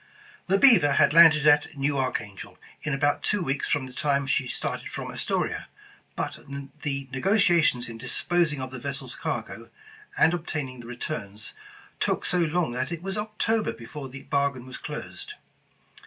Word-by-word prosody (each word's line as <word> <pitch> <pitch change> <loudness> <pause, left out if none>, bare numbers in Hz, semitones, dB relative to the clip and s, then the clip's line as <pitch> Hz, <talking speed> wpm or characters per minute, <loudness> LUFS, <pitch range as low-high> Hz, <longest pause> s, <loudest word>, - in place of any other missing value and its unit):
The 195 +1 +4
Beaver 200 - +6
had 140 - +4
landed 160 -3 +8
at 150 -1 +4
New 140 +1 +1
Archangel 120 -7 -3 0.2
in 150 - -3
about 145 +1 +1
two 205 -3 +1
weeks 135 -2 -1
from 145 -4 +1
the 130 - -11
time 140 +1 +1
she 135 -1 +1
started - - -4
from - - -5
Astoria, - - -2 0.5
but - - -3 0.4
the 140 -2 -2
negotiations 170 - +3
in 115 -1 -8
disposing 150 +4 +1
of 130 0 -5
the 130 - -6
vessel's 140 +1 -4
cargo, - - -5 0.5
and 165 - +5
obtaining 150 -7 -4
the 120 - -10
returns, 110 -4 -5 0.5
took - - 0
so 180 - +2
long 165 -3 +1
that 130 +5 -2
it 170 0 -5
was 195 +1 -3
October 215 +1 0
before 135 +4 -8
the 140 +2 -10
bargain 140 -3 0
was 130 0 -8
closed. - - -7
145 Hz, 160 wpm, -26 LUFS, 130-170 Hz, 0.5 s, landed